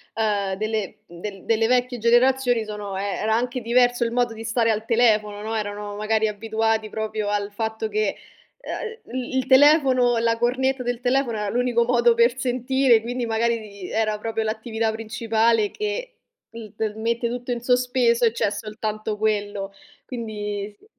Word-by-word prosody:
ehm, 205 -3 0
delle 215 -1 -3
del 190 +3 -8
delle 225 0 +2
vecchie 245 0 +1
generazioni 245 0 +3
sono 210 -2 -5
ehm, 195 - -2 0.2
era 220 0 +1
anche 245 +2 -1
diverso 245 +1 +3
il 230 - -1
modo 240 -1 +1
di 225 0 -8
stare 230 0 +1
al 215 0 -1
telefono, 215 -3 +2
no, 220 +1 -3
erano 205 -1 -4
magari 220 +1 +1
abituati 220 +1 -1
proprio 215 -1 -3
al 205 0 -1
fatto 220 +1 -3
che, 215 -1 -1 0.4
ehm, 455 -1 -6 0.2
il 260 0 -4
il 260 - -1
telefono, 260 -3 +5
la 230 0 +1
cornetta 260 +2 0
del 245 -1 -2
telefono 250 -2 0
era 210 -1 -2
l'unico 240 0 +1
modo 240 -1 +4
per 235 +2 +3
sentire, 255 -1 +2
quindi 245 +2 -3
magari 230 +1 +1
di 200 -4 -9
era 215 -1 0
proprio 225 +1 -2
l'attività 220 0 -2
principale 220 0 +1
che 465 +4 -4 0.4
il 220 -3 -9
t 215 -1 -2
mette 235 +1 -1
tutto 245 +1 -4
in 235 - -5
sospeso 245 -1 +2
e 225 - +2
c'è 205 - +1
soltanto 215 0 -4
quello. 205 -2 -1 0.3
Quindi 210 -4 -5
sì. - - -24
225 Hz, 165 wpm, -23 LUFS, 215-245 Hz, 0.4 s, telefono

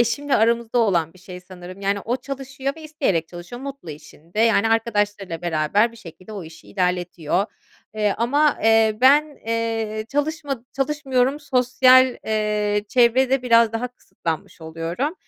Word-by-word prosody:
eşimle 270 +5 +1
aramızda 235 +1 +1
olan 175 -8 +2
bir - - -18
şey 180 0 -10
sanırım 185 +1 -11
yani 200 +1 0
o 240 +5 -2
çalışıyor 270 +1 -5
ve 320 - -11
isteyerek 265 - -1
çalışıyor. 175 +9 -9
Mutlu 275 - -7
işinde 155 +6 -8
yani 225 -1 +3
arkadaşlarıyla 205 -6 -1
beraber 175 +8 +1
bir - - -15
şekilde 185 0 -12
o 195 -5 -6
işi 160 0 -14
ilerletiyor. 180 -1 -1 0.5
Eee, 210 -2 +1
ama, 285 +6 +2
eee, 225 -1 +4
ben, 290 +3 +4
eee, 225 -1 -2
çalışma 290 -3 -2
çalışmıyorum; 270 -1 0
sosyal, 255 -1 +4
eee, 210 -1 0
çevrede 255 +1 +3
biraz 230 -2 +4
daha 240 +2 -2
kısıtlanmış 165 -9 -6
oluyorum. 165 - -3
225 Hz, 140 wpm, -22 LUFS, 185-260 Hz, 0.5 s, eee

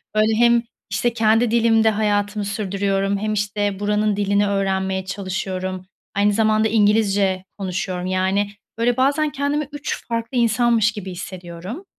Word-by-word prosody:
Böyle, 215 +1 +3
hem, 235 +1 +4 0.3
işte, 240 -1 0
kendi 225 0 +3
dilimde 225 -1 +4
hayatımı 205 -1 0
sürdürüyorum 200 -1 -1
hem, 215 +1 -2
işte, 205 -1 -1
buranın 210 0 +1
dilini 200 0 +1
öğrenmeye 190 -1 -1
çalışıyorum, 185 -1 -4 0.3
aynı 205 +1 +3
zamanda 215 0 +3
İngilizce 205 -3 +2
konuşuyorum. 185 -1 -3
Yani, 190 +2 +1 0.3
böyle, 235 +1 +1
bazen 285 +4 +2
kendimi 285 0 -1
3 290 0 -5
farklı 230 +2 -3
insanmış 230 -2 +3
gibi 200 -3 -7
hissediyorum. 185 - -8
205 Hz, 130 wpm, -21 LUFS, 195-225 Hz, 0.3 s, hem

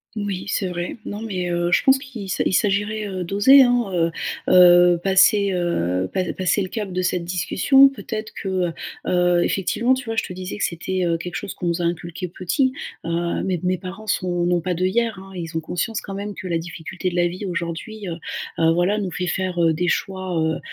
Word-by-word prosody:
Oui, 205 -3 -3
c'est 200 -1 0
vrai. 175 +4 -4
Non, 205 +2 -5
mais, 185 -5 -3
heu, 175 0 0
je - - +4
pense 265 0 +5
qu'il 250 -8 -8
s'a - - 0
il - - +1
s'agirait, 210 +2 +1
heu, 185 -2 -4
d'oser, 205 +10 +6
hein, 245 -1 +3
heu 170 -1 +1 0.4
heu, 175 -1 +7
passer, 195 +1 +4
heu, 95 - 0
pa 185 - +1
passer 185 +2 +1
le 185 - -2
cap 210 -2 -4
de 185 0 -1
cette 180 -1 0
discussion, 235 +10 +4
peut-être 220 -5 -6
que, 195 - -5 0.2
heu 165 - -5 0.3
heu, 180 -1 +3
effectivement, 230 +6 +1
tu 260 0 -6
vois? 225 -1 -3
Je - - +1
te - - -7
disais 185 +1 -6
que - - -2
c'était, 185 +2 -2
heu, 170 -1 +1
quelque 175 +2 -7
chose 205 - -5
qu'on - - -6
nous 170 0 0
a 170 - 0
inculqué 170 +1 -3
petit, 255 - 0 0.3
heu, 170 +1 -1
mes 185 -3 -1
mes 180 0 0
parents 195 +3 -8
sont 180 -4 0
n'ont 175 -1 +1
pas 180 +1 -2
d'œillères, 205 +5 0
hein. 195 0 -11
Ils 165 -2 -4
ont 160 - -1
conscience 180 +7 -2
quand 195 - -8
même 200 +1 -5
que 185 - -7
la 165 -2 0
difficulté 175 +2 -5
de 175 - -7
la 175 0 +3
vie 185 +4 -6
aujourd'hui, 180 +5 -5
heu 165 -1 -4 0.4
heu, 165 0 +4
voilà, 180 +5 +1
nous 190 -3 -3
fait 180 +3 -3
faire, 185 -1 -1
heu, 165 -1 +4
des 175 +3 -1
choix, 185 -3 -1
heu 160 0 0
185 Hz, 225 wpm, -22 LUFS, 175-205 Hz, 0.4 s, heu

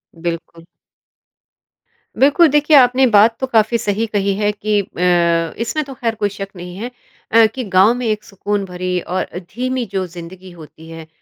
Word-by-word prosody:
बिल्कुल। 165 0 -6 1.6
बिल्कुल, 290 +5 +5
देखिए 295 +2 +3
आपने 255 0 +5
बात 225 +1 +4
तो 265 - -2
काफ़ी 225 -1 +2
सही 210 0 -1
कही 200 -1 +1
है 205 +1 0
कि 210 0 -1
अ, 170 -3 0
इसमें 235 +7 -2
तो 270 - -9
खैर 230 -3 -3
कोई 205 -1 -1
शक 195 0 -7
नहीं 180 0 -9
है। 235 +5 -5 0.4
अ, 230 0 +6
कि 260 - -3
गाँव 195 +1 +4
में 245 0 -4
एक 215 -1 -1
सुकून 200 0 -3
भरी 180 0 -3
और 185 +2 -2
अ, - - -10
धीमी 250 +7 -4
जो 190 -1 -1
ज़िंदगी 180 +2 -11
होती 160 -1 -14
है 165 -1 -10
205 Hz, 175 wpm, -18 LUFS, 180-235 Hz, 1.6 s, अ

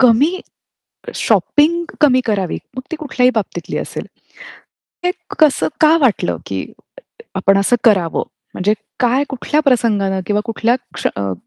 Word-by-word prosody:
कमी 270 +9 +4 0.7
शॉपिंग 340 +4 +2 0.2
कमी 260 -4 +5
करावी. 195 -6 -1 0.2
मग 255 - -4
ती 325 - -3
कुठल्याही 260 -5 +1
बाबतीतली 215 -3 -3
असेल. - - -5 1.0
हे 360 - +3 0.3
कसं 305 -3 +4
का 315 +1 +6
वाटलं, 255 -7 +1
की - - -3 0.7
आपण 195 +1 +3
असं 200 +5 +3
करावं? 185 -7 +3 0.3
म्हणजे 200 +3 +1 0.3
काय 250 +3 +2
कुठल्या 285 +3 -1
प्रसंगानं 210 -7 +2
किंवा 210 0 +1
कुठल्या 230 +1 +1 0.2
क्ष - - -1
अ, 100 -1 -2
245 Hz, 130 wpm, -17 LUFS, 200-285 Hz, 1.0 s, का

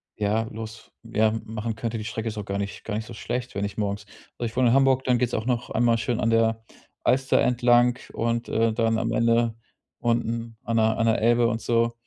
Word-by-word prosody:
ja, 105 +2 0
los 110 0 -9
f 115 - -12
ja, 110 0 +4
machen 110 +1 -4
könnte. 115 0 -3
Die - - -5
Strecke 110 0 -4
ist 105 - -8
auch 105 - -3
gar 100 0 -3
nicht 100 0 -5
gar 105 - -3
nicht 110 +1 -3
so - - -9
schlecht, 125 +2 -4
wenn 100 - -1
ich 100 - -6
morgens 100 -1 -2 0.3
also, 120 - -1
ich 115 - -14
wohne 130 -2 +4
in 115 - +3
Hamburg, 135 -1 +4
dann 125 -2 +3
geht's 120 -1 0
auch 110 - -2
noch 125 -1 -1
einmal 120 -1 +3
schön 120 0 -1
an 115 - +2
der 115 0 +2 0.4
Alster 130 +1 +3
entlang 120 0 +3
und, 115 +1 -1
äh, 115 0 +2
dann 115 -1 +1
am 115 +1 -1
Ende 115 0 +2 0.4
unten 115 -1 -1
an 115 0 -1
der 110 0 +3
an 115 - +1
der 110 - +2
Elbe 120 +1 +4
und 115 -1 -2
so. 115 0 +1
115 Hz, 235 wpm, -25 LUFS, 110-120 Hz, 0.4 s, ja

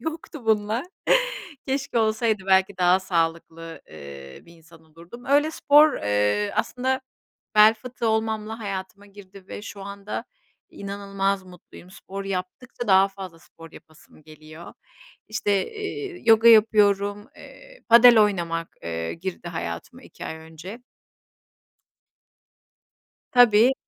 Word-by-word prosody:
yoktu 315 -4 -7
bunlar. 220 +5 0 0.8
Keşke 270 -2 -2
olsaydı, 220 -2 0
belki 190 0 +2
daha 180 +1 +3
sağlıklı, 165 -2 -3
eee, 70 -3 -11
bir 170 - -17
insan 165 0 -19
olurdum. 170 +10 -14
Öyle 290 +3 +2
spor, 300 0 +5
eee, 105 0 0
aslında 260 +1 -1 0.5
bel 215 +1 +7
fıtığı 235 +1 -5
olmamla 220 0 -2
hayatıma 200 -1 -7
girdi 195 -1 -15
ve - - -8
şu 205 -2 -9
anda 200 +1 -7 0.5
inanılmaz 195 -1 -3
mutluyum. 180 0 -16
Spor 195 +1 -9
yaptıkça 195 +5 -6
daha 190 +1 +5
fazla 190 -4 -10
spor 165 -1 -16
yapasım 155 0 -18
geliyor. 155 +2 -13 0.6
İşte, 205 - -1
eee, 415 -3 -6
yoga 225 0 +6
yapıyorum, 205 -2 +3
eee, - - -16
padel 235 0 +8
oynamak, 170 -5 -1
eee, 80 0 -4
girdi 175 0 -7
hayatıma 85 - -7
2 - - -12
ay 160 - -6
önce. 160 +7 -11 2.5
Tabii. 245 0 +5
200 Hz, 115 wpm, -24 LUFS, 170-225 Hz, 2.5 s, padel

